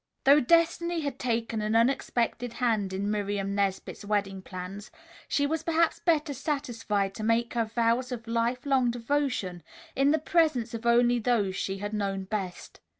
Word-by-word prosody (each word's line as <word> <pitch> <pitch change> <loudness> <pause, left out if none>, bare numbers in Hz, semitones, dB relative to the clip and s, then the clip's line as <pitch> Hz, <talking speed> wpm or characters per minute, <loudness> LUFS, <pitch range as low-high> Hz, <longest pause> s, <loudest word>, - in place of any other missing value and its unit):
Though 280 +2 +7
destiny 335 +3 +2
had 285 -2 -4
taken 230 -3 -1
an 215 +1 -1
unexpected 235 0 +1
hand 225 -5 0
in 200 +2 -2
Miriam 200 -1 -2
Nesbit's 200 0 -2
wedding 200 -2 -1
plans, 185 +2 -8 0.4
she 285 - +1
was 315 +2 -1
perhaps 330 0 +1
better 310 -4 +1
satisfied 230 -8 -2
to 215 - -6
make 230 +2 +1
her 230 -1 +1
vows 235 +3 0
of 235 -2 -5
life 235 +2 -1
long 265 -3 +3
devotion 235 -7 -1 0.3
in 275 +1 +3
the 310 - +4
presence 300 -7 +1
of 230 +1 -4
only 240 +1 +4
those 215 -5 +1
she 195 0 -2
had 205 +2 -5
known 195 -2 -2
best. 190 -2 -5
230 Hz, 160 wpm, -28 LUFS, 205-270 Hz, 0.4 s, Though